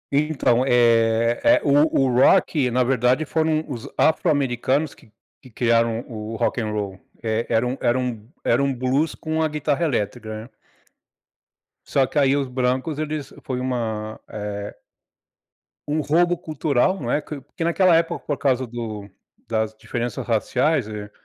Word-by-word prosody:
Então 140 -5 +2
é 115 -2 +3
é 295 +1 +5
o 145 +1 +3
o - - +2
rock 135 -3 +4
na 125 +1 +2
verdade, 125 +3 +2
foram 160 0 0
os 125 -6 -6
afro-americanos 145 -3 +1
que 110 - -21 0.3
que 130 - -15
criaram 115 0 +1
o 110 -1 -6
rock 120 - 0
and 110 - -2
roll 100 -3 -4 0.2
é 110 0 -1
era 115 +1 +2
um 125 - -2
era 120 +2 +2
um 120 -3 -4 0.2
era - - +3
um 140 - +1
blues 130 +5 0
com 160 0 -2
a 160 - +2
guitarra 150 +1 -1
elétrica, 110 -4 -3
né. 120 - -14 1.4
Só 135 -2 +2
que - - -6
aí 140 -1 +4
os 140 -2 -1
brancos, 130 +4 -1
eles 155 -2 -4
foi 125 -1 -3
uma, 110 -4 -3
eh 105 -1 -5 1.1
Um 150 +2 0
roubo 175 +4 +2
cultural, 155 +2 0
não 120 -2 -3
é, - - +2
porque 150 +3 -7
naquela 170 +1 +4
época, 165 0 -1
por 145 - -2
causa 130 -2 +1
do 110 -4 -6 0.4
das 110 -1 -1
diferenças 115 +1 -4
raciais 125 +3 +1
eh, 105 -1 -7
125 Hz, 155 wpm, -22 LUFS, 115-150 Hz, 1.4 s, é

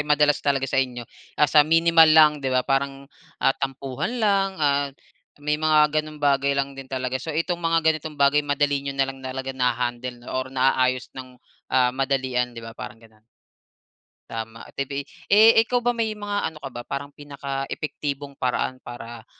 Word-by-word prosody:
madalas 150 0 +3
talaga 140 -2 +1
sa 135 0 +1
inyo 125 -2 -4 0.3
nasa 150 0 +5
minimal 165 +1 +5
lang, 155 -1 +7
'di 135 - -2
ba, 130 0 +1
parang, 135 0 -1 0.3
ah, - - +2
tampuhan 135 - -4
lang, 200 -4 +2
ah, 145 -2 +1 0.6
may 150 0 0
mga 155 -1 +4
gano'ng 155 0 -10
bagay 140 -1 +2
lang 140 0 -1
din 135 -1 -10
talaga. 130 0 -3
So, 160 - -8
itong 170 +3 -1
mga 165 -1 +1
ganitong 155 -1 0
bagay 140 +1 +4
madali 145 -1 0
niyo 140 0 -5
na 135 -1 +1
lang 135 - -15
talaga 130 0 -5
naha-handle 125 -1 -2
or 130 0 -2
naayos 130 -1 +1
nang, 130 -1 -10 0.3
ah, 125 -1 +3
madalian, 130 -2 -1
'di 115 - -8
ba, 115 - -8
parang 125 +1 -9
gano'n? 110 -1 -21 1.1
Tama. 115 0 -6
Ito 140 - -5
ba 140 - -7
ay - - -23 0.2
eh, 215 +3 +7 0.2
ikaw 245 0 0
ba 245 - +2
may 230 -2 -1
mga 205 -1 -2
ano - - -11
ka 135 - -6
ba 120 -1 -7
parang 140 +1 -5
pinakaepektibong 140 0 -5
paraan 130 0 -1
para, 120 -2 -10
140 Hz, 175 wpm, -24 LUFS, 130-150 Hz, 1.1 s, lang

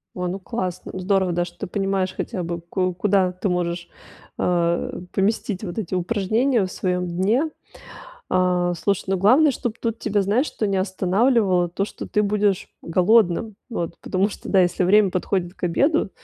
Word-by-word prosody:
О, 180 -1 -2
ну, 190 +2 -3
классно, 185 -4 -4
здорово, 190 -1 +1
да, 175 +1 0
что 175 - -10
ты - - -4
понимаешь 195 -1 -1
хотя 180 - -3
бы, 170 0 -4
ку 185 +1 -1
куда 190 0 +2
ты 185 +2 -3
можешь, 175 -1 -2 0.5
э, 170 -1 0
поместить 200 0 -1
вот 190 +3 -4
эти 185 -2 -3
упражнения 220 +6 +1
в 185 - -7
своем 180 -1 -1
дне. 210 - +1 0.8
А, 180 -1 +2
слушай, 200 +3 -1
ну, 190 0 +1
главное, 265 - +5
чтобы 235 -2 -3
тут 230 -1 -2
тебя, 205 -2 0
знаешь 220 +10 +1
что, 215 - -2
не 195 - 0
останавливало 190 0 +2
то, 195 +3 -1
что - - -8
ты 210 - +1
будешь 205 -2 +1
голодным. 195 +3 +2
Вот. 175 -8 -3
Потому 190 +2 +1
что, - - -9
да, 195 - +4
если 180 +1 +2
время 200 +1 +5
подходит 185 -1 -1
к 190 - -21
обеду, 275 - +2
190 Hz, 175 wpm, -22 LUFS, 180-210 Hz, 0.8 s, главное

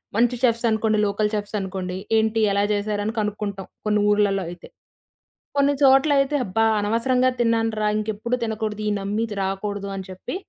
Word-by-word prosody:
మంచి 240 +2 +3
చెఫ్స్ 235 -1 +2
అనుకోండి 220 0 +1
local 210 +1 0
chefs 205 +1 -4
అనుకోండి. 185 -1 -4 0.2
ఏంటి 220 0 +1
ఎలా 200 +1 +2
జేశారని 205 +1 -1
కనుక్కుంటాం 205 -2 -3 0.2
కొన్ని 210 0 +2
ఊర్లలో 200 -2 +2
అయితే. 175 0 -10 0.9
కొన్ని 280 0 +4
చోట్లలైయితే 275 +1 +4
అబ్బా! 225 +4 +1
అనవసరంగా 250 +5 +2
తిన్నానురా! 225 -2 +1
ఇంకెప్పుడు 220 +3 -2
తినకూడదు. 220 -1 -3
ఈ - - 0
నమ్మిది 210 +3 -2
రాకూడదు 200 +1 -3
అని 190 -1 -7
చెప్పి 185 - -6
215 Hz, 145 wpm, -23 LUFS, 200-230 Hz, 0.9 s, కొన్ని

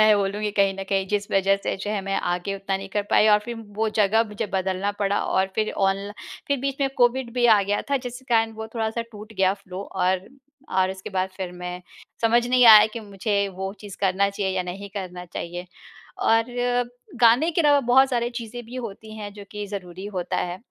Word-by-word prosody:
मैं 215 -1 +6
बोलूँगी 205 +2 -1
कहीं 195 -1 +4
न 195 - -3
कहीं 195 -1 +1
जिस 205 -1 -1
वज़ह 195 0 +3
से - - -1
जो 200 +2 -4
है 210 -1 -1
मैं 195 0 -1
आगे 175 +3 -2
उतना 195 0 -2
नहीं 195 0 -7
कर 205 +1 -1
पाई 215 - +5
और 210 - +6
फ़िर 240 -1 -5 0.2
वो 220 +1 +1
जगह 215 +3 +4
मुझे 210 0 -4
बदलना 190 +1 0
पड़ा 200 0 +1
और 190 0 +1
फ़िर 215 0 0 0.2
ऑनल 195 +1 -2 0.4
फ़िर 280 -1 +1
बीच 275 0 -2
में 275 - +3
कोविड 245 0 +2
भी 245 -1 +3
आ 215 -3 +6
गया 205 +1 0
था 280 - +3
जिसके 250 +2 -7
कारण 225 0 +3
वो 220 0 -6
थोड़ा-सा 225 0 -1
टूट 210 +1 -10
गया 190 -2 +3
फ़्लो 190 -1 -8
और, 185 0 -1 0.4
और 185 0 +2
उसके 190 +1 -8
बाद 190 0 0
फ़िर 185 -2 -4
मैं 180 0 -5 0.4
समझ 235 +1 +4
नहीं 250 0 +4
आया 210 - +9
कि 230 - -5
मुझे 205 0 -2 0.2
वो 190 0 -2
चीज़ 205 -2 -9
करना 195 0 +2
चाहिए 195 -1 -2
या 185 - +1
नहीं 190 +3 -7
करना 180 -2 -5
चाहिए 175 +1 -6 0.6
और 225 0 +5 0.8
गाने 245 +8 +5
के 340 +1 +1
अलावा 290 -2 +5
बहुत 265 +1 +6
सारी 240 -1 0
चीज़ें 235 +1 -7
भी 245 - -8
होती 215 +1 -10
हैं 205 -1 -6
जो 205 -1 -10
कि 210 -1 -5
ज़रूरी 190 -1 -7
होता 175 - -2
है 175 0 -2
205 Hz, 215 wpm, -24 LUFS, 190-225 Hz, 0.8 s, आया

